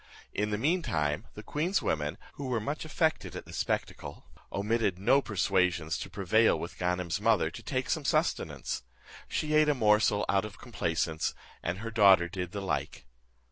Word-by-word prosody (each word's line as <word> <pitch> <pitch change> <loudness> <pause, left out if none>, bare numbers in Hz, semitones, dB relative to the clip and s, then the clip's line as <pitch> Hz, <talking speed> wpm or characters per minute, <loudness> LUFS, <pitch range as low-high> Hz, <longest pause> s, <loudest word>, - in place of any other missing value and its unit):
In 105 +1 0
the 105 - 0
mean 165 - +2
time 75 - -1
the 105 - -8
queen's 165 - 0
women, 75 -1 -1 0.2
who 140 - -6
were 125 -3 0
much 145 +9 -4
affected 160 0 0
at - - -6
the - - -12
spectacle, - - -3 0.3
omitted 105 -2 0
no 120 +9 +4
persuasions 90 - +1
to - - -6
prevail 100 +4 +3
with 85 - -7
Ganem's 90 -2 -1
mother - - +3
to - - -9
take - - -2
some - - 0
sustenance. - - 0 0.5
She 155 0 -1
ate 155 0 +5
a 150 - +3
morsel 105 -3 +3
out 100 -1 +2
of 105 0 -8
complaisance, 85 -8 -2 0.3
and 85 +2 -2
her 115 +3 -5
daughter 100 -6 +6
did 90 0 -5
the 100 - -4
like. 95 - -3
105 Hz, 175 wpm, -30 LUFS, 90-120 Hz, 0.5 s, daughter